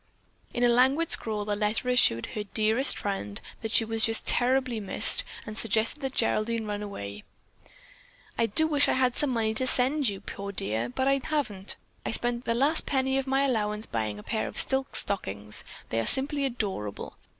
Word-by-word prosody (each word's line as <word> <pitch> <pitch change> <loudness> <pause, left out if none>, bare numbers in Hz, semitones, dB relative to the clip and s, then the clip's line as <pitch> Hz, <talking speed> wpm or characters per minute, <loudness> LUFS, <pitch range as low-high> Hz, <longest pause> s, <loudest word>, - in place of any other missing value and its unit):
In 245 - -2
a - - +5
languid 265 +7 +2
scrawl, 210 -2 +1
the 205 0 -1
letter 210 +4 -2
assured 180 - +3
her 210 - -4
"dearest" 220 +6 +1
friend 105 - -4 0.2
that 225 - -5
she 225 - +4
was 225 0 -1
just 225 0 +1
terribly 255 -1 +1
missed 200 - +6 0.2
and 215 - -8
suggested 225 +5 0
that 270 -1 -4
Geraldine 225 0 -1
run 205 -1 -4
away. 100 - -7 1.1
"I 230 - +1
do 315 +10 +2
wish 295 -2 +2
I - - +2
had 255 -1 +1
some 295 - 0
money 225 -3 -1
to 255 +4 0
send 265 +3 +2
to 205 - 0
you, 195 - -9
poor 200 0 -7
dear, 115 - -2
but 260 - -2
I 275 0 +2
haven't. 240 -11 -3 0.3
I - - -3
spent 240 +1 -1
the 230 - 0
last 285 +6 +3
penny 265 -1 +1
of 270 - -5
my 270 +1 +1
allowance 215 -5 -1
buying 110 -2 -3
a 105 - -11
pair 220 - -2
of - - -2
silk 265 0 +2
stockings. 105 - 0 0.3
They 115 - -1
are 115 - -2
simply 280 +1 +3
adorable! 200 - -5
225 Hz, 195 wpm, -27 LUFS, 205-265 Hz, 1.1 s, missed